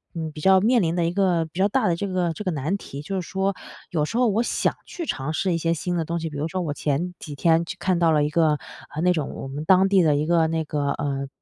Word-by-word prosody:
嗯， 160 -2 -4
比 150 - -9
较 190 +1 +6
面 235 +1 +4
临 165 -1 0
的 175 -2 +1
一 170 - 0
个 180 -4 +2
比 160 +3 -9
较 195 - +4
大 225 +1 +1
的 170 - +2
这 200 +4 -3
个 180 -3 0
这 210 - -6
个 185 - -1
难 155 +4 -1
题 140 -7 -8
就 195 +3 -3
是 - - -10
说， 195 0 0 0.4
有 155 -4 +1
时 225 - -3
候 250 - +4
我 220 +2 +2
想 - - 0
去 340 - -6
尝 135 - -3
试 180 +2 0
一 - - +1
些 165 +1 +1
新 175 +2 -2
的 165 -2 -1
东 170 +1 -2
西。 160 -1 -3
比 145 - -7
如 155 +3 -1
说 185 +2 -3
我 150 -4 -2
前 155 +5 -1
几 150 -3 -8
天 165 +3 +3
就 175 - -6
看 185 0 +1
到 165 -1 +4
了 150 -1 +3
一 150 - 0
个， 155 -2 +3 0.4
呃， 155 - -2
那 180 - +4
种 155 -5 -2
我 135 - -6
们 145 +3 -5
当 190 +2 +5
地 195 -1 +5
的 155 -4 +3
一 145 +1 0
个 165 -1 +3
那 160 0 -1
个， 145 -1 -1
呃， 140 -1 -3
170 Hz, 320 characters per minute, -24 LUFS, 155-185 Hz, 0.4 s, 较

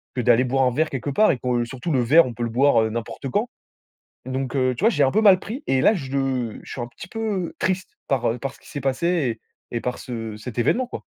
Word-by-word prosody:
que 125 - -2
d'aller 120 +1 +4
boire 135 +2 +1
un 125 - +1
verre 160 +3 +1
quelque 135 +1 -4
part 215 +9 +4
et 135 - -1
que 125 -1 0
surtout 130 +7 -5
le 130 - +3
verre, 150 +8 +6
on 120 - -5
peut 120 +1 -4
le 115 - -1
boire, 130 0 +4
heu, 110 - 0
n'importe 115 +4 -5
quand. 215 - 0 0.8
Donc 130 0 -3
heu, 130 -1 +2
tu 170 - -7
vois, - - +7
je - - -3
l'ai 140 - +5
un 135 - +3
peu 215 - +3
mal 195 -3 +7
pris 245 +10 -6
et 130 - +2
là, - - +6
je 135 - -2
je - - -13
suis - - -6
un 120 - -3
petit 170 +8 -11
peu, 225 - -8 0.3
heu, - - -13
triste 185 0 -1 0.2
par 130 -3 +1
heu, 115 - -3
par 135 +2 -5
ce - - -20
qui - - -18
s'est 145 - -5
passé 135 -3 0 0.3
et - - -2
et - - 0
par 125 0 -3
ce 115 -3 -6
cet 120 +2 -8
événement, 245 - +2
quoi. - - -7
130 Hz, 285 wpm, -23 LUFS, 120-160 Hz, 0.8 s, vois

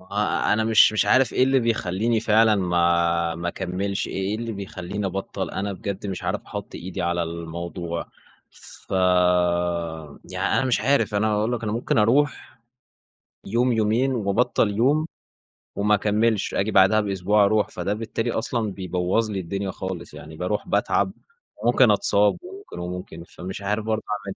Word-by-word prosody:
ما 90 - -19
هو 100 - -18 0.4
أنا 110 +1 +1
مش 110 -1 +6
مش 110 -2 +2
عارف 130 +3 +4
إيه 130 - +3
اللي 135 0 +3
بيخليني 115 0 0
فعلًا 110 0 +4
ما 85 -2 +1
ما 85 +1 -4
أكملش 95 +2 -3
إيه - - -7
إيه 95 +2 -1
اللي 115 0 -4
بيخليني 100 0 -5
أبطل؟ 95 +1 -4
أنا 100 +2 -3
بجد 100 +1 -5
مش 95 -2 -5
عارف - - -2
أحط - - -7
إيدي 90 +1 -5
على 85 0 0
الموضوع. 85 +1 -5 0.4
فيعني 90 -4 0
أنا 135 - +1
مش 125 -5 +1
عارف، 135 -2 +2
أنا 105 +1 +2
هاقول 105 +2 0
لك 120 -2 -3
أنا 105 -2 -2
ممكن 115 0 0
أروح 130 +8 +1 0.9
يوم، 120 +4 +1
يومين 115 +4 +1
وأبطل 105 -2 +1
يوم، 145 +7 +2 0.7
وما 105 +1 +3
أكملش، 105 +1 +1
آجي 105 +3 0
بعدها 100 +3 +5
بأسبوع 100 +1 +2
أروح. 105 +1 +2
فده 100 - -3
بالتالي 115 +2 -3
أصلًا 110 -1 -2
بيبوظ 95 +4 -1
لي 100 - -2
الدنيا 95 +2 -3
خالص، 95 -1 -6
يعني 80 +2 -10
باروح 90 +5 -2
باتعب - - +1 0.5
وممكن - - +5
أتصاب - - +3
وممكن، 390 +2 -10
وممكن 90 -1 -6
فمش 95 +3 -8
عارف 105 +2 -2
برضه 110 0 -1
أعمل 100 -2 -4
100 Hz, 160 wpm, -24 LUFS, 90-110 Hz, 0.9 s, مش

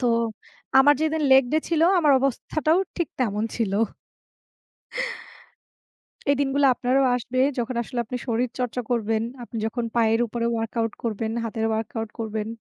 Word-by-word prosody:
তো 250 - +1 0.7
আমার 290 +2 +7
যেদিন 315 0 0
লেগ 265 0 +7
ডে 310 - +4
ছিল 330 -2 +1 0.2
আমার 300 -4 +4
অবস্থাটাও 310 +5 +1 0.2
ঠিক 345 -3 -1
তেমন 210 -3 0
ছিল। 220 -5 -1 2.6
এই 285 - +5
দিনগুলা 280 0 +3
আপনারও 260 +3 +2
আসবে, 250 +1 -3 0.2
যখন 240 +1 -2
আসলে 245 +1 -5
আপনি 250 +3 -4
শরীর 240 +1 0
চর্চা 250 0 -1
করবেন, 225 -2 0 0.2
আপনি 230 - -7
যখন 235 +2 -2
পায়ের 225 -1 +3
উপরে 235 +1 -3
ওয়ার্কআউট 225 0 -2
করবেন, 220 0 -2
হাতের 225 0 -2
ওয়ার্কআউট 220 0 -3
করবেন। 220 -1 -3
240 Hz, 145 wpm, -24 LUFS, 225-270 Hz, 2.6 s, আমার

